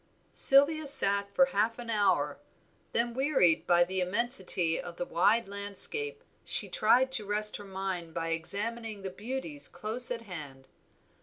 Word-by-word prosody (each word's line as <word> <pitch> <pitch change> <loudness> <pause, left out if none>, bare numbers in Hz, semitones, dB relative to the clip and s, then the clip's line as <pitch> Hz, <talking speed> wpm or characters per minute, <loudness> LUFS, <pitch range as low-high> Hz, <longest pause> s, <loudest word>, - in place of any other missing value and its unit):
Sylvia 290 +2 +3
sat 200 -7 +4
for 270 - +5
half 225 -2 -1
an 240 -1 -6
hour, 180 -10 0 0.5
then 235 0 0
wearied 235 - +1
by 175 0 +4
the 185 +1 -2
immensity 185 -4 -1
of 175 -1 -9
the 175 - -4
wide 205 +7 +1
landscape 205 - -2 0.2
she - - +2
tried 260 - +2
to 225 - -2
rest 210 +1 +5
her 205 - -11
mind 190 -3 -5
by 165 +1 -4
examining 205 +5 -4
the 190 - -5
beauties 190 - -4
close 230 +3 -1
at 240 -2 -2
hand. 145 -9 -10
205 Hz, 150 wpm, -29 LUFS, 175-240 Hz, 0.5 s, for